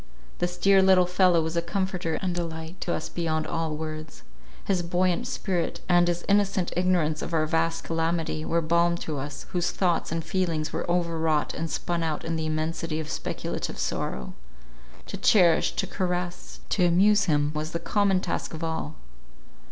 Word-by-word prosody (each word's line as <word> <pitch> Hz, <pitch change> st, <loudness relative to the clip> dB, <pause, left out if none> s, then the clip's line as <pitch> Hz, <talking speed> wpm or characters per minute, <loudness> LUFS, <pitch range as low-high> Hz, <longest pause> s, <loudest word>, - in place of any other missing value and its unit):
This 175 Hz, 0 st, -1 dB
dear 195 Hz, -1 st, +5 dB
little 190 Hz, -1 st, +5 dB
fellow 180 Hz, -2 st, +3 dB
was 160 Hz, +1 st, -3 dB
a 170 Hz, -, +2 dB
comforter 180 Hz, -2 st, -2 dB
and 180 Hz, -2 st, 0 dB
delight 165 Hz, 0 st, -5 dB
to 175 Hz, -, -1 dB
us -, -, -2 dB
beyond 160 Hz, -2 st, -1 dB
all 160 Hz, -1 st, -2 dB
words. 155 Hz, 0 st, -7 dB, 0.4 s
His 190 Hz, -3 st, +1 dB
buoyant 180 Hz, +6 st, 0 dB
spirit, 190 Hz, -8 st, -2 dB
and 175 Hz, -1 st, +4 dB
his 175 Hz, 0 st, -1 dB
innocent 200 Hz, -3 st, +2 dB
ignorance 175 Hz, -4 st, +1 dB
of 170 Hz, -, -3 dB
our 155 Hz, -1 st, +2 dB
vast 165 Hz, +1 st, 0 dB
calamity, 165 Hz, -1 st, -1 dB
were 165 Hz, +1 st, 0 dB
balm 170 Hz, +1 st, +2 dB
to 150 Hz, -3 st, -3 dB
us, 145 Hz, +2 st, -6 dB
whose 175 Hz, -1 st, 0 dB
thoughts 180 Hz, -3 st, 0 dB
and 165 Hz, -1 st, -2 dB
feelings 165 Hz, -3 st, -1 dB
were -, -, -3 dB
over 170 Hz, -2 st, 0 dB
wrought 155 Hz, -2 st, +1 dB
and 165 Hz, 0 st, -3 dB
spun 170 Hz, +2 st, -2 dB
out 160 Hz, -2 st, -2 dB
in 165 Hz, 0 st, -1 dB
the 160 Hz, -1 st, -2 dB
immensity 155 Hz, +1 st, -2 dB
of 155 Hz, -1 st, -5 dB
speculative -, -, -4 dB
sorrow. 65 Hz, 0 st, -3 dB, 0.7 s
To -, -, -6 dB
cherish, 175 Hz, -6 st, +4 dB
to -, -, -1 dB
caress, 180 Hz, -2 st, -3 dB
to 185 Hz, -, +2 dB
amuse 200 Hz, +4 st, +4 dB
him 145 Hz, -3 st, +2 dB
was 155 Hz, +1 st, -3 dB
the 170 Hz, -, -3 dB
common 200 Hz, -2 st, +2 dB
task -, -, -3 dB
of 160 Hz, -, -6 dB
all. 160 Hz, -1 st, -3 dB
170 Hz, 175 wpm, -26 LUFS, 160-180 Hz, 0.7 s, dear